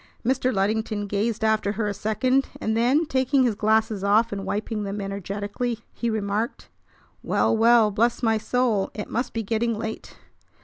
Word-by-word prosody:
Mr. 255 +1 +1
Luddington 210 +1 -1
gazed 210 +3 -1
after 215 -2 +1
her 215 0 -2
a 205 - -1
second; 255 +6 +1
and 220 0 -1
then, 255 +8 +3
taking 265 -1 +2
his 240 -3 +2
glasses 220 -1 +1
off 215 +3 +3
and 195 -1 -5
wiping 215 +1 -2
them 200 0 -4
energetically, 205 +4 -4
he 235 - -2
remarked: 215 +1 -2 0.5
"Well, - - +1
well, 225 -1 +5
bless 235 +5 +1
my 225 -1 +2
soul! 230 -4 0
It 210 - -6
must 245 +2 -1
be 225 - -3
getting 225 +1 -1
late! 220 0 -6
220 Hz, 165 wpm, -24 LUFS, 205-235 Hz, 0.5 s, well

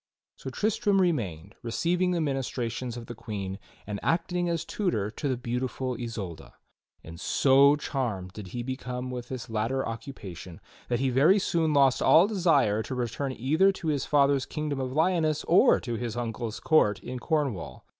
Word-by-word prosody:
So 135 - -7
Tristram 205 - +1
remained, 100 - -1
receiving 175 +10 0
the 175 -1 0
ministrations 125 -4 -2
of 120 - -7
the 120 - -7
Queen, 100 -4 -5 0.3
and 105 -1 -4
acting 175 +1 0
as 170 -2 -1
tutor 110 - -1
to 140 +5 -3
the 130 - 0
beautiful 125 +1 -3
Isolda; 110 -8 -6 0.5
and 80 +1 -10
so 140 +1 +5
charmed 110 -11 -3
did 105 0 -8
he 120 +6 -5
become 125 0 -4
with 125 -1 -5
this 130 -2 -5
latter 115 +4 -1
occupation 95 - -8 0.3
that 120 -1 +1
he 135 -1 +1
very 150 +10 +5
soon 165 -5 +1
lost 140 -3 +4
all 170 - +6
desire 170 - +2
to 130 - -5
return 125 +2 -2
either 155 +11 +3
to 170 -4 -4
his 145 -3 -1
father's 140 -2 +3
kingdom 150 -3 -3
of 130 -1 -2
Lyoness 155 0 +1
or 195 +9 +5
to 120 - -4
his 120 0 -4
uncle's 115 -2 -4
court 105 -10 +3
in 125 0 -6
Cornwall. 140 - -2
130 Hz, 165 wpm, -27 LUFS, 115-155 Hz, 0.5 s, all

